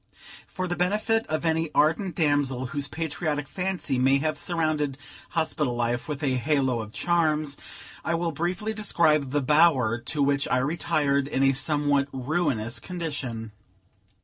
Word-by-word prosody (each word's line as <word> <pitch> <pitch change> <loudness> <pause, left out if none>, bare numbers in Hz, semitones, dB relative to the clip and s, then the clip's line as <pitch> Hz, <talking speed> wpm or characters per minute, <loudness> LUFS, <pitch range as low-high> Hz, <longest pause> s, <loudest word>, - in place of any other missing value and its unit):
For 185 0 -4
the 175 - -2
benefit 215 +5 +1
of 155 +2 -2
any 160 0 +1
ardent 165 +5 +2
damsel 145 -5 +1
whose 145 +2 -2
patriotic 155 -2 -3
fancy 180 -8 -2
may 135 +2 +4
have 155 +2 -1
surrounded 155 -4 -1 0.3
hospital 155 -6 0
life 120 0 -1
with 150 -1 -4
a 130 -3 +1
halo 130 -2 +1
of 110 -1 -6
charms, 155 -2 +1 0.5
I 170 - 0
will 170 0 -1
briefly 175 +8 -2
describe 160 -9 +2
the 145 +2 0
bower 135 -6 +4
to 140 +5 -1
which 140 0 +1
I 125 - +2
retired, 140 0 +1
in 135 -2 0
a 135 0 +4
somewhat 145 0 +1
ruinous 130 -4 -1
condition. 145 - -5
150 Hz, 145 wpm, -26 LUFS, 135-165 Hz, 0.5 s, may